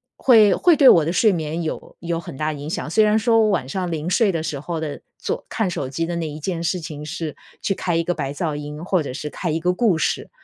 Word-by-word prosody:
会 220 Hz, -6 st, +6 dB
会 345 Hz, -3 st, +4 dB
对 275 Hz, -, +6 dB
我 165 Hz, -9 st, +8 dB
的 165 Hz, -, -1 dB
睡 210 Hz, +2 st, +4 dB
眠 160 Hz, 0 st, -3 dB
有 160 Hz, -, -6 dB
有 170 Hz, 0 st, -2 dB
很 165 Hz, -5 st, -8 dB
大 155 Hz, 0 st, -1 dB
影 145 Hz, +1 st, -7 dB
响。 160 Hz, -, -3 dB
虽 215 Hz, +5 st, +4 dB
然 215 Hz, +1 st, +3 dB
说 225 Hz, 0 st, +3 dB
我 215 Hz, -, +3 dB
晚 130 Hz, -10 st, 0 dB
上 180 Hz, +3 st, -3 dB
临 160 Hz, +2 st, -3 dB
睡 200 Hz, +1 st, +3 dB
的 165 Hz, -2 st, -2 dB
时 150 Hz, -3 st, -3 dB
候 160 Hz, +3 st, -4 dB
的 155 Hz, -2 st, -5 dB, 0.2 s
做 -, -, -4 dB
看 220 Hz, -5 st, -1 dB
手 135 Hz, -6 st, -3 dB
机 165 Hz, +5 st, -2 dB
的 170 Hz, 0 st, -3 dB
那 165 Hz, -2 st, -2 dB
一 150 Hz, +1 st, -7 dB
件 170 Hz, +1 st, -3 dB
事 180 Hz, +2 st, 0 dB
情 150 Hz, -2 st, -7 dB
是 155 Hz, 0 st, -5 dB, 0.3 s
去 195 Hz, -, 0 dB
开 175 Hz, -2 st, -1 dB
一 -, -, +2 dB
个 175 Hz, -, +1 dB
白 140 Hz, -4 st, -3 dB
噪 150 Hz, 0 st, -2 dB
音， 150 Hz, +3 st, -6 dB
或 185 Hz, -5 st, +1 dB
者 130 Hz, -, -5 dB
是 150 Hz, +2 st, -5 dB
开 170 Hz, +4 st, -4 dB
一 160 Hz, -, 0 dB
个 180 Hz, +2 st, +1 dB
故 195 Hz, -5 st, +2 dB
事， -, -, -1 dB
165 Hz, 295 characters per minute, -22 LUFS, 150-185 Hz, 0.3 s, 我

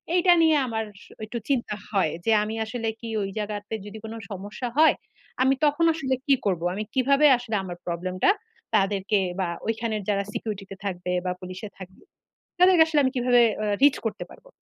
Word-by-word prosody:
এইটা 355 Hz, 0 st, +5 dB
নিয়ে 320 Hz, -2 st, +5 dB
আমার 220 Hz, -1 st, -2 dB, 0.2 s
সু -, -, -18 dB
একটু 235 Hz, +2 st, -5 dB
চিন্তা 235 Hz, -6 st, 0 dB, 0.2 s
হয়। 190 Hz, -7 st, +2 dB
যে 225 Hz, -, +3 dB
আমি 220 Hz, +1 st, -4 dB
আসলে 225 Hz, 0 st, -4 dB
কি 230 Hz, -, -6 dB
ওই 195 Hz, -, -3 dB
জায়গাতে 210 Hz, +1 st, -4 dB
যদি 210 Hz, +1 st, -8 dB
কোন 220 Hz, -, -6 dB, 0.2 s
সমস্যা 205 Hz, +6 st, -5 dB
হয়, 315 Hz, +1 st, +7 dB, 0.5 s
আমি 265 Hz, +1 st, +4 dB
তখন 295 Hz, +3 st, +2 dB
আসলে 265 Hz, -5 st, -1 dB
কি 280 Hz, -, +6 dB
করব? 180 Hz, -4 st, 0 dB
আমি 215 Hz, -, -2 dB
কিভাবে 275 Hz, +3 st, +4 dB
আসলে 235 Hz, -3 st, -4 dB
আমার 175 Hz, -2 st, -7 dB
Problem 180 Hz, +2 st, -3 dB
টা 395 Hz, -, +7 dB, 0.4 s
তাদেরকে 200 Hz, 0 st, +2 dB, 0.2 s
বা 185 Hz, -, 0 dB, 0.2 s
ওইখানের 225 Hz, -1 st, -1 dB
যারা 200 Hz, -1 st, +1 dB
Security 205 Hz, -3 st, -4 dB
তে -, -, -5 dB
থাকবে 180 Hz, -2 st, -3 dB
বা 180 Hz, -, 0 dB
পুলিশে 185 Hz, +3 st, -7 dB
এ -, -, -32 dB
থাকবে 185 Hz, 0 st, -12 dB, 0.6 s
তাদেরকে 360 Hz, -3 st, +7 dB
আসলে 305 Hz, -2 st, +2 dB
আমি 260 Hz, -, +1 dB
কিভাবে 245 Hz, -1 st, +4 dB, 0.2 s
আ -, -, -1 dB, 0.2 s
Reach 285 Hz, -1 st, +5 dB
করতে 210 Hz, -1 st, -3 dB
পারব? -, -, -18 dB
220 Hz, 195 wpm, -25 LUFS, 195-260 Hz, 0.6 s, হয়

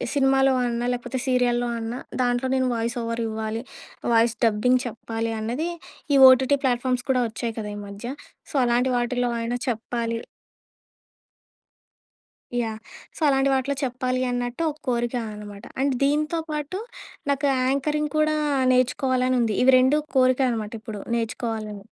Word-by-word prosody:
సినిమాలో 270 Hz, -1 st, +4 dB
అన్నా, 240 Hz, 0 st, -1 dB
లేపోతే 245 Hz, +2 st, -4 dB
సీరియల్‌లో 245 Hz, -1 st, +2 dB
అన్నా, 230 Hz, +3 st, -4 dB, 0.2 s
దాంట్లో 245 Hz, +1 st, 0 dB
నేను 260 Hz, -1 st, +1 dB
వాయిసోవరివ్వాలి. 230 Hz, -1 st, -2 dB, 0.5 s
వాయిస్ 230 Hz, 0 st, +4 dB
డబ్బింగ్ 245 Hz, +4 st, +3 dB
చెప్పాలి 225 Hz, 0 st, -4 dB
అన్నదీ, 245 Hz, +10 st, -2 dB, 0.5 s
ఈ -, -, +6 dB
ఓటీటీ 265 Hz, +2 st, +4 dB
ప్లాట్ఫామ్స్ 250 Hz, 0 st, 0 dB
కూడా 255 Hz, -, +2 dB
ఒచ్చాయి 225 Hz, +1 st, -4 dB
కదా 210 Hz, -1 st, -4 dB
ఈ -, -, -6 dB
మధ్య. 200 Hz, +3 st, -9 dB, 0.5 s
సో, -, -, -9 dB
అలాంటి 245 Hz, +2 st, +2 dB
వాటిల్లో 245 Hz, 0 st, 0 dB
అయినా 240 Hz, +1 st, -2 dB
చెప్పాలి. 230 Hz, 0 st, -2 dB, 2.4 s
యాహ్! 220 Hz, -2 st, -2 dB, 0.4 s
సో, -, -, -11 dB
అలాంటి 270 Hz, 0 st, +3 dB
వాటిలో 270 Hz, +1 st, 0 dB
చెప్పాలి 255 Hz, -1 st, -1 dB
అన్నట్టు 245 Hz, +4 st, -3 dB
ఒక 300 Hz, -, -15 dB
కోరికా 240 Hz, 0 st, 0 dB
అనమాట. 205 Hz, -1 st, -9 dB, 0.2 s
అండ్ 275 Hz, -1 st, +2 dB
దీంతో 300 Hz, +4 st, +1 dB
పాటు 300 Hz, +5 st, -3 dB, 0.5 s
నాకు 280 Hz, +1 st, +1 dB, 0.2 s
యాంకరింగ్ 300 Hz, +2 st, 0 dB
కూడా 310 Hz, 0 st, +2 dB, 0.3 s
నేర్చుకోవాలనుంది. 255 Hz, -2 st, +2 dB
ఇవి 260 Hz, 0 st, +6 dB
రెండు 260 Hz, +4 st, +4 dB, 0.2 s
కోరిక 255 Hz, +1 st, +4 dB
అనమాటిప్పుడు 220 Hz, -2 st, -5 dB
నేర్చుకోవాలని. 220 Hz, -3 st, -3 dB
245 Hz, 125 wpm, -24 LUFS, 230-265 Hz, 2.4 s, ఈ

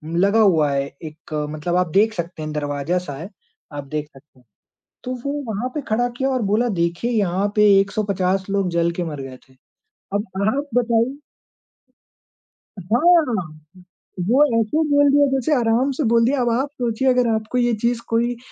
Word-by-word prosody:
लगा 200 Hz, +5 st, +3 dB
हुआ 165 Hz, -9 st, +4 dB
है 140 Hz, 0 st, 0 dB, 0.2 s
एक 155 Hz, 0 st, -10 dB, 0.2 s
मतलब 155 Hz, +3 st, -3 dB
आप 180 Hz, 0 st, +1 dB
देख 215 Hz, +5 st, +3 dB
सकते 170 Hz, -3 st, -6 dB
हैं 155 Hz, -, -5 dB
दरवाजा-सा 145 Hz, +3 st, -2 dB
है, 165 Hz, +7 st, -8 dB, 0.4 s
आप 145 Hz, -1 st, -5 dB
देख 150 Hz, +1 st, -4 dB
सकते 135 Hz, -1 st, -20 dB
हैं। 125 Hz, -, -27 dB, 0.6 s
तो 255 Hz, -, -4 dB
वो 280 Hz, -, -1 dB, 0.2 s
वहाँ 225 Hz, +5 st, -3 dB
पे 300 Hz, -, -2 dB
खड़ा 235 Hz, +3 st, +1 dB
किया 265 Hz, +1 st, 0 dB
और 260 Hz, -2 st, 0 dB
बोला 235 Hz, +3 st, +2 dB
देखिए 170 Hz, +8 st, -1 dB
यहाँ 200 Hz, -3 st, +1 dB
पे 210 Hz, 0 st, +5 dB
150 195 Hz, -2 st, -1 dB
लोग 195 Hz, -2 st, 0 dB
जल 170 Hz, 0 st, +1 dB
के 175 Hz, +1 st, -3 dB
मर 150 Hz, -4 st, -5 dB
गए 130 Hz, -1 st, -9 dB
थे। -, -, -22 dB, 0.6 s
अब 205 Hz, +1 st, 0 dB, 0.2 s
आप 280 Hz, +6 st, 0 dB
बताइए 240 Hz, +2 st, +1 dB, 1.6 s
हाँ, 225 Hz, -, +1 dB, 0.7 s
वो 265 Hz, +5 st, +5 dB, 0.2 s
ऐसे 225 Hz, +7 st, -1 dB
बोल 285 Hz, 0 st, +4 dB
दिया 285 Hz, 0 st, +5 dB
जैसे 270 Hz, +3 st, +1 dB
आराम 235 Hz, +4 st, +1 dB
से 275 Hz, +3 st, -2 dB
बोल 230 Hz, 0 st, +3 dB
दिया। 265 Hz, +2 st, +1 dB
अब 240 Hz, -, +1 dB
आप 260 Hz, +5 st, 0 dB
सोचिए 240 Hz, +2 st, 0 dB
अगर 250 Hz, -1 st, +3 dB
आपको 220 Hz, +3 st, -2 dB
ये 240 Hz, -1 st, +2 dB
चीज़ 235 Hz, 0 st, 0 dB
कोई 235 Hz, +1 st, +1 dB
अ, -, -, -17 dB
215 Hz, 180 wpm, -21 LUFS, 170-245 Hz, 1.6 s, पे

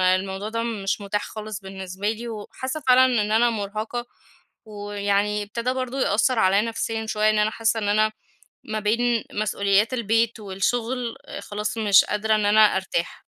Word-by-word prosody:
الموضوع 190 Hz, +2 st, -4 dB
ده 230 Hz, +1 st, -2 dB
مش 210 Hz, -3 st, -2 dB
متاح 205 Hz, +1 st, -2 dB
خالص 215 Hz, -2 st, -7 dB
بالنسبة 190 Hz, +1 st, -4 dB
لي، 235 Hz, +2 st, -6 dB
وحاسّة 260 Hz, +6 st, -5 dB
فعلًا 255 Hz, +1 st, +7 dB, 0.2 s
إن 210 Hz, +1 st, -2 dB
أنا 235 Hz, +2 st, +4 dB
مُرهقة، 215 Hz, +3 st, -4 dB, 0.6 s
ويعني 205 Hz, 0 st, -1 dB
ابتدا 235 Hz, +5 st, -2 dB
برضو 255 Hz, 0 st, -3 dB
يأثر 230 Hz, +2 st, +2 dB
عليَّ 195 Hz, +1 st, +4 dB
نفسيًا 225 Hz, -1 st, -3 dB
شويّة, 215 Hz, 0 st, +2 dB
إن 215 Hz, -, +1 dB
أنا 210 Hz, +1 st, +2 dB
حاسّة 225 Hz, 0 st, 0 dB
إن 205 Hz, -, -2 dB
أنا 215 Hz, +1 st, +3 dB, 0.6 s
ما 215 Hz, 0 st, -2 dB
بين 230 Hz, +2 st, +1 dB
مسؤوليات 210 Hz, +2 st, +1 dB
البيت 230 Hz, 0 st, +1 dB
والشغل 230 Hz, +5 st, -2 dB, 0.2 s
خلاص 210 Hz, +2 st, -4 dB
مش 205 Hz, -3 st, +5 dB
قادرة 215 Hz, +1 st, +1 dB
إن 210 Hz, -, +1 dB
أنا 215 Hz, +1 st, +5 dB
أرتاح. 190 Hz, -2 st, -3 dB
215 Hz, 155 wpm, -24 LUFS, 205-230 Hz, 0.6 s, فعلًا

